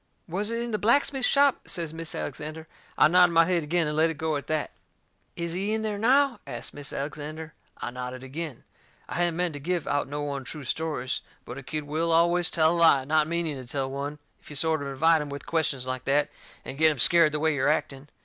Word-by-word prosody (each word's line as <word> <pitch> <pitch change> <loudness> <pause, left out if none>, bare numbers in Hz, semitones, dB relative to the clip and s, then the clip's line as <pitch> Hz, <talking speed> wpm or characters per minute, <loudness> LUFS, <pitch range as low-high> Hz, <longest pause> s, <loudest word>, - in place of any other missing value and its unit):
"Was 195 +5 -3
it 230 0 -2
in 240 - -4
the 215 - -1
blacksmith 265 +3 +3
shop?" 280 -1 +3
says 165 -3 -3
Mis' 165 -1 -5
Alexander. 155 +3 -6 0.3
I - - +7
nodded 180 +1 +5
my 165 0 +6
head 180 -1 +1
agin 165 +1 0
and 150 - -2
let 160 +1 +3
it 160 - -5
go 160 -1 -1
at 140 - -5
that. 155 -1 -1 0.6
"Is 170 -1 -3
he 195 +4 -1
in 220 0 -1
there 210 -2 -2
now?" 265 +3 +3
asts - - -5
Mis' 145 -1 -5
Alexander. 155 +2 -6 0.2
I 120 - -5
nodded 125 +1 -6
agin. 145 0 -6 0.4
I - - -7
hadn't 175 -1 +1
meant 175 -1 -1
to 145 - -6
give 175 +2 -2
out 145 -1 0
no 145 0 -3
untrue 140 +2 -6
stories. 135 -2 -2 0.2
But 125 +3 -7
a - - -8
kid 150 +3 -4
will 160 +3 -1
always 170 +1 +3
tell 160 0 +3
a - - -1
lie, 140 -5 +5
not 155 +1 +2
meaning 165 -5 -2
to - - -15
tell 135 +1 -2
one, 140 +2 -4 0.2
if - - -15
you 150 - -8
sort 160 +1 +1
of 140 - -4
invite 160 +4 +3
him 150 - -5
with 140 0 -7
questions 150 -6 0
like 130 -1 -4
that, 145 +1 +2 0.3
and 135 +2 -7
get 160 0 +6
him 150 - -2
scared 165 +5 +6
the 150 - -2
way 160 0 +2
you're 140 0 +1
acting. 140 -2 -1
155 Hz, 235 wpm, -26 LUFS, 145-170 Hz, 0.6 s, I